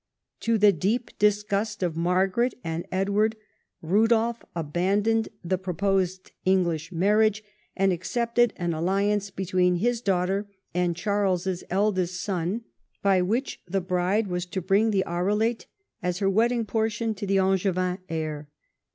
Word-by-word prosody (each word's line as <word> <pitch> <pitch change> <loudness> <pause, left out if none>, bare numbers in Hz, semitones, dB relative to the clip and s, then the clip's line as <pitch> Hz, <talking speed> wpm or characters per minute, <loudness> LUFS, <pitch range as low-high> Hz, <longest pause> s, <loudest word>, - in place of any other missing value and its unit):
To 230 0 +1
the 210 -1 +6
deep 205 +8 -1
disgust 210 0 +1
of 175 -2 0
]\Iargaret 185 +8 +1
and 165 +1 -4
Edward, 200 +3 +1 0.5
Rudolf 225 +6 +2
abandoned 195 +8 +1
the 180 +1 -1
pro 185 -2 -4
posed 190 0 0
English 175 -3 +1
marriage, 210 +4 +2 0.3
and 195 -1 +3
accepted 235 +6 +1
an 175 -1 -2
alliance 200 +5 0
between 185 -1 +1
his 235 +6 0
daughter 195 0 0 0.3
and 175 -1 +1
Charles's 190 -2 0
eldest 185 -2 0
son, 190 +3 -2 0.4
by 195 -2 +4
which 230 +9 -1
the 195 +2 0
bride 185 +4 0
was 180 -1 -3
to 190 - -3
bring 195 +5 +2
the 195 -3 +2
Arelate 210 +7 0 0.3
as 180 0 -1
her 195 0 +1
wedding 230 +3 +2
portion 220 +1 -1
to 200 -1 -6
the 195 0 +2
Angevin 185 -1 +1
heir. 155 -2 -4
195 Hz, 135 wpm, -26 LUFS, 180-215 Hz, 0.5 s, the